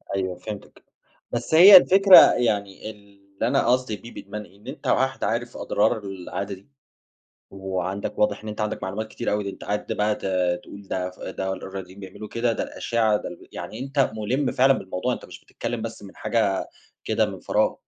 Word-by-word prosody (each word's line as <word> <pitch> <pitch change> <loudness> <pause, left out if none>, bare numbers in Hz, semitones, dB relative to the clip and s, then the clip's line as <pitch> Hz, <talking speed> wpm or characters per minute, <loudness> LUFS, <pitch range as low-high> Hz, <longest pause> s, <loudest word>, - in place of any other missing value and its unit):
أيوه 95 -2 -2
فهمتك. 105 +1 -9 0.5
بس 120 +6 -3
هي 185 +4 +11
الفكرة، 195 +1 +8 0.2
يعني 105 -3 -1
اللي 100 -1 -7
أنا 135 -1 +2
قصدي 125 -3 +1
بيه 115 +5 -12
بإدمان 105 +2 -7
إيه؟ 95 +1 -19
إن 105 - -19
أنتَ - - -7
واحد - - +1
عارف - - -2
أضرار - - +1
العادة 95 +1 -5
دي، 95 +8 -20 0.8
وعندك 95 0 -4
واضح 105 - +1
إن 110 - -8
أنتَ 105 - -6
عندك 105 0 -2
معلومات 100 +4 -4
كتيرة 120 - -3
أوي، 105 0 -1
ده 100 - -3
أنتَ - - -11
قعدت 105 0 -3
بقى 105 0 +1
ت - - -13 0.4
تقول 100 - -11
ده 95 - -2
ده - - -5
ف 90 - -19
ده 95 0 -3
الرياضيين 95 0 -8
بيعملوا 100 +2 -9
كده، 115 +1 0
ده - - -2
الأشعّة 110 -3 0
ده 90 -3 -7
يعني 110 - -7
أنتَ 135 +1 0
مُلِم 125 +5 -1
فعلًا 135 +2 +5
بالموضوع، 95 -7 -2
أنتَ - - -6
مش - - -12
بتتكلم 120 -2 -5
بس 115 -2 -7
من 100 - -12
حاجة 105 -5 0 0.4
كده - - +1
من - - -8
فراغ. - - +1
105 Hz, 190 wpm, -24 LUFS, 95-115 Hz, 0.8 s, هي